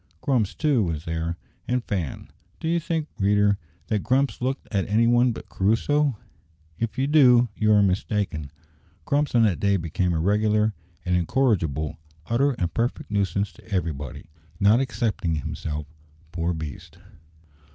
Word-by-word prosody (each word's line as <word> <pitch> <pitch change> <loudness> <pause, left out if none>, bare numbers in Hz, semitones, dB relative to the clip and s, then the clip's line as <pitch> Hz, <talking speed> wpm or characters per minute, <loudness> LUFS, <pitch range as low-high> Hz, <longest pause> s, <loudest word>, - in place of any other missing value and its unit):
Grumps, 125 -8 0
too, 145 -6 +2
was 80 -4 -2
there, 80 +1 -2 0.3
and 125 0 0
Fan. 90 -11 -4 0.3
Do - - -4
you 170 +1 +2
think, 160 -1 -2
reader, 105 0 +3 0.3
that 105 -2 -1
Grumps 135 +4 +1
looked 130 +2 -2
at 100 -2 0
any 110 +3 +3
one 120 +1 +4
but - - -8
Crusoe? 125 +6 +1 0.6
If 115 -1 -2
you 130 - +1
do, 125 -5 +5
you 110 0 +2
are 105 -1 +6
mistaken. 95 -5 -1 0.6
Grumps 145 -2 +1
on 115 - +6
that 100 -6 +2
day 100 -1 +2
became 85 +1 -1
a 80 - 0
regular, 105 +4 +2 0.3
an 90 - 0
incorrigible, 85 - 0 0.3
utter, 135 +6 +2
and 90 -7 -2
perfect 115 -2 -2
nuisance 100 0 0
to - - -18
everybody 80 - -3 0.3
not 105 +4 +5
excepting 110 -10 -1
himself, 75 +1 -4 0.5
poor 85 -1 -1
beast! 80 -3 -8
105 Hz, 150 wpm, -25 LUFS, 85-125 Hz, 0.6 s, are